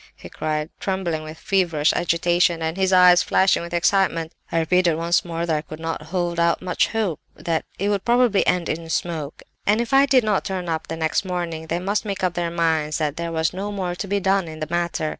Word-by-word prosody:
he - - -12
cried, 155 0 -3
trembling 190 -5 -2
with 155 +1 -9
feverish 165 -5 +1
agitation, 175 0 +2
and 160 +1 -2
his 190 0 +1
eyes 180 -1 +7
flashing 190 -2 +2
with 170 0 -7
excitement. 175 -2 +1 0.2
I - - 0
repeated 170 +1 +2
once 170 +2 +1
more 170 -1 -3
that 165 -2 0
I 150 - -1
could 155 0 -10
not 165 -1 -4
hold 170 +1 -2
out 170 0 +2
much 180 -1 0
hope—that 175 -5 -3
it 200 +2 -1
would 200 -2 0
probably 240 -4 +3
end 180 -2 +1
in 165 +1 -4
smoke, 160 -3 -3 0.2
and 210 +2 +4
if 235 +3 -2
I 275 +1 +6
did 260 -3 +4
not 210 -3 +1
turn 190 -3 -4
up 160 -1 -3
next 160 +2 -1
morning 170 -3 -4
they 165 - -1
must 195 +4 -1
make 200 -3 -4
up 180 -2 +1
their 175 -1 -2
minds 160 -3 0
that 150 -2 -1
there 170 0 -4
was 160 0 0
no 200 +3 -4
more 185 -3 -3
to 185 +3 -5
be 200 +1 0
done 190 -1 +1
in 155 -1 -8
the 155 - -3
matter. 170 -2 -1
175 Hz, 220 wpm, -22 LUFS, 160-190 Hz, 0.2 s, eyes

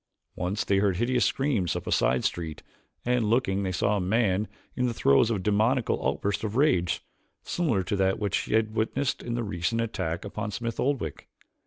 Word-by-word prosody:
Once 90 +4 -1
they 100 - +2
heard 100 -3 +2
hideous 120 +3 +2
screams 130 - 0
up - - -4
a - - -3
side - - +2
street, 80 -3 -3 0.4
and 125 -1 +2
looking 110 -5 +2
they 95 -1 -1
saw 100 +4 +1
a - - -1
man 100 +1 +1 0.3
in 125 -1 +1
the 120 - -2
throes 70 +7 +4
of 115 - +1
a - - -2
demoniacal 110 +5 +1
outburst 100 +10 -1
of 110 0 -3
rage, 90 - +2 0.4
similar 135 - 0
to 100 - -2
that 95 -1 +2
which 100 -3 -1
they - - +1
had 110 -1 +1
witnessed 120 +5 -1
in 120 -1 -3
the 120 - -1
recent 100 +1 -1
attack 90 -7 -2
upon 105 +2 -4
Smith 115 +1 -4
Oldwick. 125 - -2
105 Hz, 195 wpm, -27 LUFS, 95-120 Hz, 0.4 s, throes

